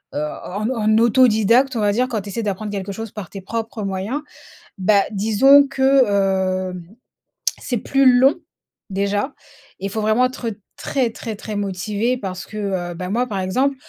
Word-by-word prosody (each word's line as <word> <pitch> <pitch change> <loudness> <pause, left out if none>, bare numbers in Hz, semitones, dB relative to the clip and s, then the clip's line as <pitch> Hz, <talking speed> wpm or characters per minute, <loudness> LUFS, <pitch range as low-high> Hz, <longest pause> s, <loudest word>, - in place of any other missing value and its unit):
heu, 145 - -1 0.2
en 205 +4 -3
au 260 - -2
en 215 -1 +2
autodidacte, 235 +2 +4
on 225 - -1
va 205 - +3
dire, 250 +5 +1
quand 220 -5 -2
tu 200 - -9
essaies 230 +3 -3
d'apprendre 205 +1 -3
quelque 200 0 -4
chose 225 +1 -6
par 205 -5 -8
tes 195 - -7
propres 225 +2 -4
moyens, 195 +9 -3 0.6
bah, 200 +1 +3
disons 225 +8 +5
que 270 -1 +4
hem 185 -2 0 0.8
c'est 245 - -2
plus 270 +2 +4
long 270 +3 +5 0.5
déjà 200 +6 -1 0.5
et 195 - -5
il - - -1
faut 220 +1 -2
vraiment 220 +4 +3
être 255 -2 -3 0.2
très 255 -5 -1
très 225 -1 -6
très 210 +1 -7
motivé, 205 +5 -1
parce 185 -4 -6
que, 215 - -9
heu, 185 -4 -2
bah, 180 +1 -5
moi 245 +3 0
par 200 -4 -3
exemple 260 +10 0
215 Hz, 180 wpm, -20 LUFS, 195-245 Hz, 0.8 s, disons